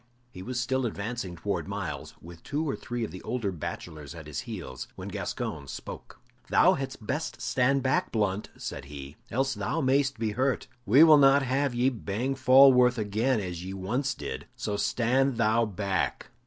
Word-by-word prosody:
He 90 - -9
was 120 +6 -3
still 130 0 0
advancing 105 -3 -4
towards 100 +4 -3
Myles, 95 -9 -5
with 85 0 -11
two 155 +2 -2
or 140 - -1
three 120 -1 -4
of 110 - -4
the 90 - -8
older 115 -6 -2
bachelors 80 -3 -7
at 80 -2 -9
his 75 - -5
heels, 105 - -6
when - - -7
Gascoyne 70 -2 -4
spoke. - - -8 0.3
"Thou - - +5
hadst 135 -5 -5
best 155 +7 -3
stand 130 +1 +1
back, 130 0 +1
Blunt," 105 -2 -1
said - - -6
he, 70 0 -9
"else 135 +3 0
thou 165 - -2
mayst 135 -1 +2
be 110 -1 -1
hurt. 130 +4 0 0.2
We 130 +10 +8
will 155 -2 +8
not 140 0 +6
have 135 0 0
ye 125 +2 +3
bang 115 +3 -2
Falworth 130 -2 +6
again 110 +4 +1
as 90 -3 -5
ye 95 +1 -6
once 125 +9 -1
did, - - -6
so 110 -4 -3
stand 125 +4 +1
thou 115 0 +3
back!" 100 -2 -2
115 Hz, 180 wpm, -28 LUFS, 95-130 Hz, 0.3 s, We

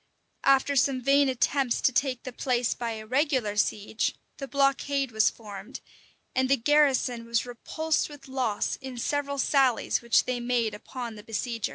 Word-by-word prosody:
After 275 +1 +4
some 270 0 +2
vain 275 +2 +3
attempts 260 0 +1
to - - +3
take 260 -1 0
the 255 - -7
place 245 -1 0
by 235 -1 -4
a 215 0 -7
regular 255 -4 0
siege, 210 +1 0 0.2
the 275 - -6
blockade 275 -1 +1
was 220 -1 +3
formed, 210 +1 -9 0.5
and 260 0 +1
the 275 - +4
garrison 260 -3 +2
was 235 0 0
repulsed 315 +7 -2
with 285 -2 -12
loss 255 -6 -1
in 265 -2 -8
several 280 +3 -1
sallies 270 -4 +2
which 235 -1 +3
they 250 -1 -2
made 240 -3 0
upon 235 +2 -7
the 210 -1 -11
besiegers. 230 0 -3
255 Hz, 165 wpm, -27 LUFS, 230-275 Hz, 0.5 s, After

